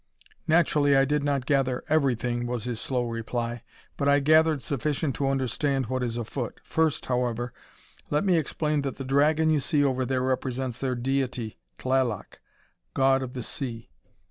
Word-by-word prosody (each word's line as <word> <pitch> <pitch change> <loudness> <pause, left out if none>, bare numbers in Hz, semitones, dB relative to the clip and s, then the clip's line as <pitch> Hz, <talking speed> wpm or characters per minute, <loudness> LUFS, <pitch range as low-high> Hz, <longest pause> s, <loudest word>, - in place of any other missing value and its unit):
"Naturally, 150 -4 +4
I 135 - +5
did 150 +1 0
not 140 -3 0
gather 135 -3 +1
everything," 125 -5 +1
was 120 -2 -3
his 120 -1 -4
slow 125 -2 -1
reply, 115 0 -3 0.4
"but 140 -1 +1
I 140 0 +5
gathered 155 -1 +4
sufficient 140 +2 -1
to 135 -1 +1
understand 135 0 0
what 130 +2 -2
is 120 -1 -2
afoot. 120 +1 -4
First, 160 -2 0
however, 125 -1 -1 0.6
let 150 +4 +1
me 185 -3 +4
explain 155 -1 0
that 135 -2 -3
the 135 - -6
dragon 150 +4 +3
you 155 - +3
see 145 +1 +1
over 130 -2 +1
there 130 0 0
represents 130 -1 -2
their 130 -2 -1
deity 125 -3 -2 0.2
Tlaloc, 130 -5 -1 0.6
god 135 0 +4
of 130 -1 -5
the 125 - -5
sea. 115 - -5
135 Hz, 165 wpm, -27 LUFS, 125-145 Hz, 0.6 s, I